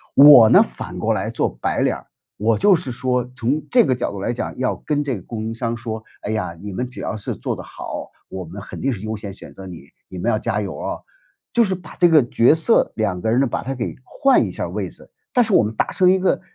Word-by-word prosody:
我 140 -6 +9
呢， - - +7
反 - - -8
过 - - +1
来 - - -2
做 - - 0
白 - - 0
脸 - - +2
儿， - - -12 0.3
我 110 +1 +1
就 200 +1 +5
是 150 -7 0
说 125 0 0
从 135 +5 -1
这 245 -3 +5
个 130 - +2
角 125 -1 -2
度 100 - -7
来 100 - -2
讲， 120 - -5
要 130 0 0
跟 145 -1 -2
这 130 -7 -3
供 110 +3 -6
应 115 - -3
商 115 0 -3
说， 110 -2 -6 0.2
哎 105 - -4
呀， 105 -6 -2
你 100 +1 -7
们 125 +5 -3
只 125 - -9
要 - - -3
是 105 - -5
做 - - -3
得 - - -8
好， - - -7 0.2
我 95 -1 -6
们 90 +4 -9
肯 - - -9
定 135 - +1
是 105 -7 -5
优 110 +1 -4
先 105 -2 -7
选 95 - -12
择 95 -1 -10
你， 85 -6 -10 0.2
你 95 - -9
们 115 +7 0
要 110 - +1
加 110 -2 -1
油 100 -2 -4
啊。 - - -3 0.6
就 235 - +5
是 190 -4 0
把 180 - -12
这 175 - +5
个 155 -4 +6
角 120 +5 +4
色 165 +8 +3
两 100 -5 -1
个 110 - -1
人 120 - +3
呢， 140 - +3
把 120 - -2
它 135 +2 -4
给 120 - -4
换 275 - +3
一 - - -3
下 - - -4
位 - - -4
子， - - -13 0.2
但 245 - +5
是 220 - -2
我 120 - +6
们 105 +1 -3
达 - - +1
成 185 - +2
一 190 - +3
个 185 - +1
120 Hz, 290 characters per minute, -21 LUFS, 105-145 Hz, 0.6 s, 我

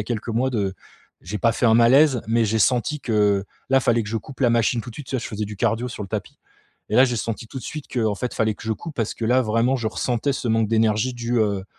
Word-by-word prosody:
a - - -3
quelques 120 0 -4
mois 120 +3 +1
de 105 -7 -1 0.5
j'ai 95 +6 -5
pas 115 +3 +2
fait 120 - +1
un 110 - +5
malaise, 125 +3 +5
mais 115 0 +2
j'ai 110 +2 0
senti 125 +6 +1
que 105 -6 +1 0.2
là, 135 0 +4
fallait 120 -2 +2
que 105 - -7
je 115 - -2
coupe 130 +5 -9
la 125 - +4
machine 115 0 +2
tout 125 - -10
de 115 - -9
suite, 145 - -9
tu - - -5
vois? - - -2
Je - - -4
faisais 105 0 -3
du 105 +1 -7
cardio 115 +3 0
sur 115 -3 -6
le 100 - -7
tapis, 105 0 -5 0.5
et - - -3
là, 130 - +8
j'ai 125 -2 -1
senti 115 +1 -4
tout 135 - -7
de - - -9
suite 150 -2 -6
qu'en 110 -4 +1
fait, 125 +5 -4
fallait 110 -1 0
que - - -14
je 110 - 0
coupe 155 +8 -8
parce 115 -3 -1
que 115 - -3
là, 125 +3 +3
vraiment, 115 +3 +1
je 115 -3 -3
ressentais 120 +4 -1
ce 130 - -3
manque 115 0 +2
d'énergie 110 +2 +2
dû, 120 0 -2
heu, 100 -3 0
115 Hz, 285 wpm, -23 LUFS, 110-125 Hz, 0.5 s, là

